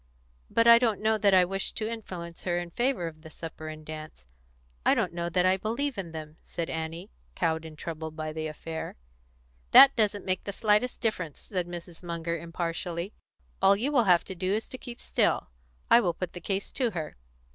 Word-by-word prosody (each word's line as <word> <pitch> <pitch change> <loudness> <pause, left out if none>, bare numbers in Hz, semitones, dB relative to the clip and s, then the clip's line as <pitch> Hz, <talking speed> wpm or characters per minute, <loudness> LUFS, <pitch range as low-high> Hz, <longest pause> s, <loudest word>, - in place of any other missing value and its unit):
"But 230 - +3
I 235 0 +9
don't 225 -4 +1
know 220 0 +2
that 200 -2 +5
I 180 -1 +6
wish 195 +2 -2
to 215 - -2
influence 180 -7 -6
her 175 -1 0
in 175 -1 -4
favour 245 -3 0
of 155 -1 -7
the 160 - -11
supper 155 0 -8
and 155 0 -8
dance; 155 - -8 0.6
I - - +5
don't - - 0
know 170 0 -2
that 180 +1 +2
I 185 +1 +4
believe 235 +7 -2
in 185 -4 -5
them," 155 -1 -8
said 170 -1 -4
Annie, 165 +5 -5 0.2
cowed 160 -1 0
and 155 -1 -10
troubled 160 0 -5
by 155 0 -4
the 155 0 -3
affair. 160 +1 -6 0.8
"That 275 0 +10
doesn't 210 -2 +1
make 185 0 -1
the 200 - -3
slightest 215 +4 +2
difference," 185 - -2
said 180 -4 -3
Mrs. 175 -1 -8
Munger 170 -1 -3
impartially. 170 +2 -3 0.5
"All 195 - +6
you 245 +8 -1
will 245 -6 +4
have 175 -3 +5
to 190 - -7
do 185 +1 -2
is 220 - -3
to 255 - -7
keep 240 -1 -8
still. - - +1 0.4
I - - +9
will 180 -7 0
put 185 -2 -4
the 175 - -7
case 195 0 -2
to 250 -3 +1
her." 165 -7 -5
175 Hz, 205 wpm, -28 LUFS, 165-210 Hz, 0.8 s, That